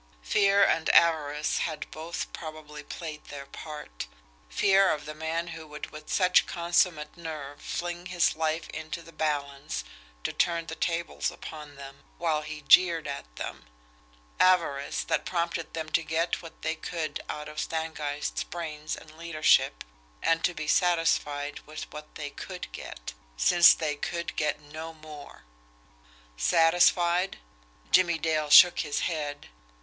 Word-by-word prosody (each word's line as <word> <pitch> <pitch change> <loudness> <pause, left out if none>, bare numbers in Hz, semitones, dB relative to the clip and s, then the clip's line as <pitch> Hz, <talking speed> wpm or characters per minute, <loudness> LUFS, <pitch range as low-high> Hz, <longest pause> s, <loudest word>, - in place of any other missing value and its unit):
Fear 200 - +4
and 160 - +1
avarice 150 -3 +3
had 150 - -2
both 160 +2 -5
probably 155 -2 -8
played 155 0 -7
their 140 -1 -8
part; 150 - -8 0.4
fear 195 - +4
of 150 -1 -1
the 155 - -6
man 160 +2 -3
who 160 -1 -8
would 150 0 -8
with 155 0 -10
such 180 -1 +4
consummate 170 -3 +1
nerve 155 -4 -7
fling 175 +1 -4
his 180 -2 +2
life 160 0 -1
into 160 +1 -6
the 165 - -14
balance 140 - -2 0.4
to - - -2
turn 170 -1 +1
the 160 - -6
tables 170 -1 -1
upon 150 -2 -9
them, 140 0 -11
while 160 -2 0
he 155 -1 -7
jeered 170 +1 +5
at 100 - -7
them; - - -6 0.7
avarice 165 -7 +3
that - - 0
prompted 170 -2 -2
them 160 -1 -3
to 165 - +2
get 165 +2 -1
what 165 -2 -13
they 160 - 0
could 160 -2 -4
out 150 0 -5
of 150 - -7
Stangeist's 155 -2 -2
brains 155 -3 -5
and 155 0 -14
leadership, 155 - +3 0.4
and 165 0 +2
to 175 - +1
be 155 -1 -5
satisfied 160 -4 +1
with 155 0 -6
what 150 0 -10
they 145 -1 -5
COULD 180 +3 -7
get - - -8 0.2
since 170 - +7
they 155 -3 -2
could 170 +3 -4
get 150 -1 0
no 155 +2 -8
more! 155 -2 -12 0.9
Satisfied? 175 - +4 0.5
Jimmie 170 -2 +5
Dale 155 -1 0
shook 175 +4 +9
his 150 -3 -1
head. 150 -4 -3
155 Hz, 145 wpm, -28 LUFS, 150-170 Hz, 0.9 s, shook